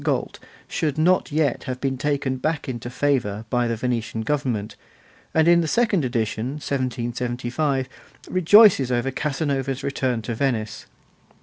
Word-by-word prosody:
Galt' -, -, -1 dB, 0.3 s
should 150 Hz, -4 st, -2 dB
not 175 Hz, +2 st, +2 dB
yet 145 Hz, -4 st, 0 dB
have 130 Hz, -2 st, -4 dB
been 135 Hz, 0 st, -1 dB
taken 135 Hz, -1 st, -1 dB
back 155 Hz, +3 st, -2 dB
into 120 Hz, -2 st, -5 dB
favour 120 Hz, -6 st, 0 dB
by 120 Hz, -1 st, +2 dB
the 115 Hz, -, -1 dB
Venetian 115 Hz, -1 st, -2 dB
government, 120 Hz, -5 st, -2 dB, 0.6 s
and 160 Hz, 0 st, +3 dB
in 170 Hz, 0 st, +6 dB
the 165 Hz, -, -1 dB
second 215 Hz, -3 st, +2 dB
edition, 120 Hz, 0 st, -2 dB
1775, 125 Hz, 0 st, -2 dB, 0.4 s
rejoices 185 Hz, -, +6 dB
over 125 Hz, +2 st, 0 dB
Casanova's 135 Hz, -1 st, -2 dB
return 130 Hz, -4 st, -1 dB
to 120 Hz, -, -3 dB
Venice. 110 Hz, -3 st, -2 dB
130 Hz, 135 wpm, -23 LUFS, 120-150 Hz, 0.6 s, in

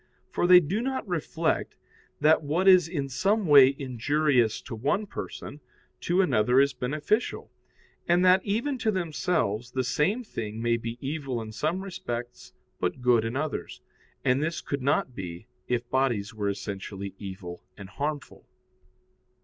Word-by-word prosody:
For 175 Hz, -, +1 dB
they 180 Hz, 0 st, +9 dB
do 180 Hz, +7 st, -2 dB
not 260 Hz, -2 st, -3 dB
reflect 165 Hz, -2 st, -1 dB, 0.5 s
that 155 Hz, +2 st, +5 dB
what 160 Hz, +6 st, 0 dB
is 185 Hz, -3 st, +7 dB
in 150 Hz, -5 st, -3 dB
some 195 Hz, -, +1 dB
way 140 Hz, -3 st, +7 dB
injurious 130 Hz, -2 st, +1 dB
to 130 Hz, -, -9 dB
one 145 Hz, -, 0 dB
person, 150 Hz, -6 st, -7 dB, 0.4 s
to 180 Hz, +3 st, +2 dB
another 125 Hz, -, +3 dB
is 140 Hz, 0 st, +3 dB
beneficial, 150 Hz, -, -2 dB, 0.6 s
and 175 Hz, +2 st, +3 dB
that 185 Hz, +1 st, +5 dB
even 240 Hz, +7 st, -1 dB
to 220 Hz, -, 0 dB
themselves 160 Hz, -, -1 dB
the 130 Hz, -, 0 dB
same 185 Hz, -, 0 dB
thing 110 Hz, -, -6 dB
may 115 Hz, 0 st, +1 dB
be 115 Hz, +1 st, -6 dB
evil 135 Hz, -3 st, -3 dB
in 110 Hz, -1 st, -7 dB
some 155 Hz, -, -2 dB
respects, 120 Hz, -10 st, -6 dB, 0.3 s
but 90 Hz, +8 st, -2 dB
good 120 Hz, -3 st, +4 dB
in 115 Hz, +2 st, -3 dB
others. 155 Hz, +2 st, -3 dB, 0.5 s
And 125 Hz, +2 st, +3 dB
this 155 Hz, +1 st, -1 dB
could 140 Hz, -1 st, -4 dB
not 135 Hz, -1 st, +1 dB
be, 90 Hz, -2 st, -7 dB, 0.2 s
if 120 Hz, -1 st, -1 dB
bodies 120 Hz, -5 st, 0 dB
were 105 Hz, -2 st, -2 dB
essentially 100 Hz, 0 st, -5 dB
evil 95 Hz, -3 st, -8 dB
and 100 Hz, -, -9 dB
harmful. 145 Hz, +5 st, -5 dB
140 Hz, 150 wpm, -27 LUFS, 115-175 Hz, 0.6 s, they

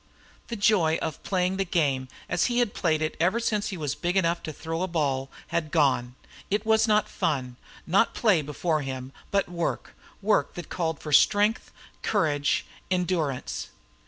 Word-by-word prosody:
The 235 Hz, -, -4 dB
joy 190 Hz, -7 st, +3 dB
of 155 Hz, -, -4 dB
playing 185 Hz, 0 st, 0 dB
the 195 Hz, -, +1 dB
game, 145 Hz, -8 st, 0 dB, 0.2 s
as -, -, +1 dB
he 240 Hz, -1 st, 0 dB
had 240 Hz, -4 st, +2 dB
played 155 Hz, -3 st, +1 dB
it 155 Hz, -, -2 dB
ever 185 Hz, +7 st, +2 dB
since 215 Hz, -3 st, 0 dB
he 195 Hz, -, -4 dB
was 150 Hz, -3 st, -2 dB
big 175 Hz, +5 st, -1 dB
enough 170 Hz, -2 st, +2 dB
to 155 Hz, -, -5 dB
throw 165 Hz, +2 st, -4 dB
a 185 Hz, -, 0 dB
ball, 140 Hz, -6 st, -1 dB, 0.2 s
had 170 Hz, -2 st, -1 dB
gone. 130 Hz, -6 st, +2 dB, 0.3 s
It 210 Hz, +2 st, 0 dB
was 220 Hz, 0 st, +4 dB
not 210 Hz, -1 st, +3 dB
fun, 130 Hz, -5 st, -2 dB, 0.3 s
not 195 Hz, +7 st, +3 dB
play 205 Hz, -9 st, +3 dB
before 150 Hz, +2 st, -1 dB
him, 130 Hz, -1 st, -5 dB, 0.2 s
but 200 Hz, -1 st, +1 dB
work, 170 Hz, -1 st, -3 dB, 0.2 s
work 210 Hz, +1 st, +1 dB
that 175 Hz, -2 st, -7 dB
called 160 Hz, -4 st, -2 dB
for 150 Hz, -, -7 dB
strength, 205 Hz, -, +4 dB, 0.3 s
courage, 145 Hz, -2 st, +1 dB, 0.2 s
endurance. 175 Hz, -7 st, -1 dB
170 Hz, 170 wpm, -27 LUFS, 150-195 Hz, 0.3 s, was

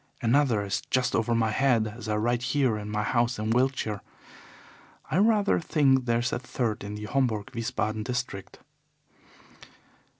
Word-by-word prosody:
Another 120 Hz, -4 st, +2 dB
is 100 Hz, -, -2 dB
just 130 Hz, -1 st, +1 dB
over 115 Hz, +1 st, +1 dB
my 110 Hz, -1 st, +1 dB
head 120 Hz, -2 st, +2 dB
as 120 Hz, -2 st, -8 dB
I 105 Hz, -, +1 dB
write 120 Hz, +3 st, 0 dB, 0.2 s
here 130 Hz, -6 st, +3 dB
in 105 Hz, 0 st, -6 dB
my 105 Hz, 0 st, -1 dB
house 120 Hz, +1 st, +1 dB
in 110 Hz, +1 st, -2 dB
Wiltshire. 120 Hz, -4 st, 0 dB, 1.1 s
I -, -, +1 dB
rather 210 Hz, 0 st, +3 dB
think 135 Hz, -6 st, +2 dB
there 115 Hz, -1 st, +2 dB
is 120 Hz, +1 st, -1 dB
a -, -, -1 dB
third 120 Hz, -4 st, -3 dB
in 100 Hz, +1 st, -6 dB
the 105 Hz, 0 st, -6 dB
Homburg 110 Hz, -4 st, -1 dB
Wiesbaden 110 Hz, -2 st, -2 dB
district. 125 Hz, -5 st, -4 dB
120 Hz, 160 wpm, -27 LUFS, 110-130 Hz, 1.1 s, here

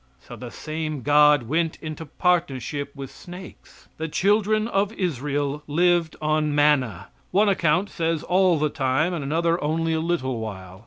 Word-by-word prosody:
So -, -, -11 dB
the -, -, -8 dB
same 155 Hz, -3 st, -5 dB
God 150 Hz, -2 st, +5 dB
went 160 Hz, +6 st, -1 dB
into 155 Hz, 0 st, -7 dB
partnership 145 Hz, -5 st, -1 dB
with 135 Hz, -2 st, -8 dB
snakes. 180 Hz, +1 st, -13 dB
The 160 Hz, -, -3 dB
children 210 Hz, +5 st, +2 dB
of 200 Hz, -2 st, 0 dB
Israel 145 Hz, -, -2 dB
lived 170 Hz, +1 st, +2 dB
on 155 Hz, -1 st, 0 dB
manna 140 Hz, -10 st, +2 dB, 0.2 s
one 205 Hz, +3 st, +3 dB
account 180 Hz, +1 st, +1 dB
says 165 Hz, -3 st, -1 dB
all 185 Hz, -2 st, +3 dB
the 155 Hz, 0 st, +1 dB
time, 140 Hz, +7 st, 0 dB
and 165 Hz, -5 st, -3 dB
another 165 Hz, +4 st, 0 dB
only 160 Hz, +2 st, 0 dB
a 160 Hz, -, 0 dB
little 160 Hz, -7 st, -1 dB
while. 95 Hz, -4 st, -7 dB
155 Hz, 155 wpm, -24 LUFS, 145-175 Hz, 0.2 s, God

